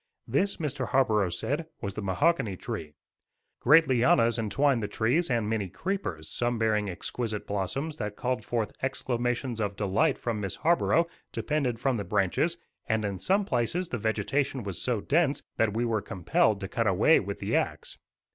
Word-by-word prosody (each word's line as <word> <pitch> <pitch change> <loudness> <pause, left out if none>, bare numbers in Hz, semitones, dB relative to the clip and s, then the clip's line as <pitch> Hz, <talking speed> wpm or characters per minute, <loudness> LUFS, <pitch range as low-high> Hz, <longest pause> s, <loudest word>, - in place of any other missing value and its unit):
This, 200 +1 +1
Mr. 140 -5 -2
Harborough 110 -8 +2
said, 145 - -2
was 100 -1 -4
the 105 - -5
mahogany 105 - +1
tree. 75 -3 -6 0.6
Great 155 +5 +6
lianas 120 -2 +3
entwined 125 +3 +2
the 105 - -2
trees 135 +14 +1
and 115 -4 +1
many 105 -3 -1
creepers, 95 - -4
some 120 +5 -1
bearing 105 -2 +1
exquisite 105 +4 -4
blossoms 135 - -3
that 105 0 -4
called 125 -2 -2
forth 115 -1 -1
exclamations 120 -2 -1
of 100 -1 -1
delight 105 +10 +1
from 115 -3 -3
Miss 100 -3 -2
Harborough, 170 0 +3 0.3
depended 140 -7 -1
from 130 0 +1
the 100 - -2
branches; 105 - +1 0.3
and 110 -2 +1
in 100 -2 -3
some 200 +2 +2
places 170 - -1
the 120 - -3
vegetation 120 +5 -1
was 100 -3 -4
so 120 -5 0
dense 150 +1 +1
that 110 -2 +1
we 120 +1 +1
were 110 -3 0
compelled 100 +3 +1
to 95 - -3
cut 115 +3 -1
a 95 - +3
way 155 - +5
with 100 0 -4
the - - -2
axe. - - -2
115 Hz, 175 wpm, -28 LUFS, 105-140 Hz, 0.6 s, Great